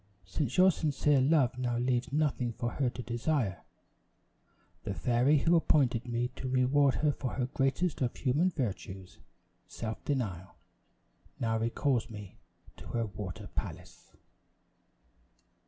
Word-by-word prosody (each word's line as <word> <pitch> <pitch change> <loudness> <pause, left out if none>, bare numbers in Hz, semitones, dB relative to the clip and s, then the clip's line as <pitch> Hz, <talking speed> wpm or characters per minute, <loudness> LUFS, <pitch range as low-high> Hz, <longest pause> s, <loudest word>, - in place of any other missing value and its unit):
Since 120 +7 -2
your 185 +1 +7
sincere 145 -3 +2
love 130 -3 +3
now 120 -2 0
leaves 125 +2 0
nothing 140 -5 0
for 120 +1 -3
her 135 -3 0
to 125 - -7
desire, 120 - -1 1.2
the 100 -3 -3
fairy 125 - +3
who 165 +4 +3
appointed 130 -7 +2
me 120 +1 -1
to 130 - -4
reward 130 +2 +3
her 150 -1 +2
for 135 -3 -4
the 125 - +1
greatest 135 +6 0
of 125 -2 0
human 145 +8 +2
virtues 95 - -5 0.5
self 110 -1 -6
denial, 95 - -3 0.8
now 115 -1 0
recalls 115 +1 0
me 105 -4 -10 0.4
to - - -11
her 115 -1 -1
water 100 -3 -7
palace." - - -7
125 Hz, 130 wpm, -31 LUFS, 115-145 Hz, 1.2 s, your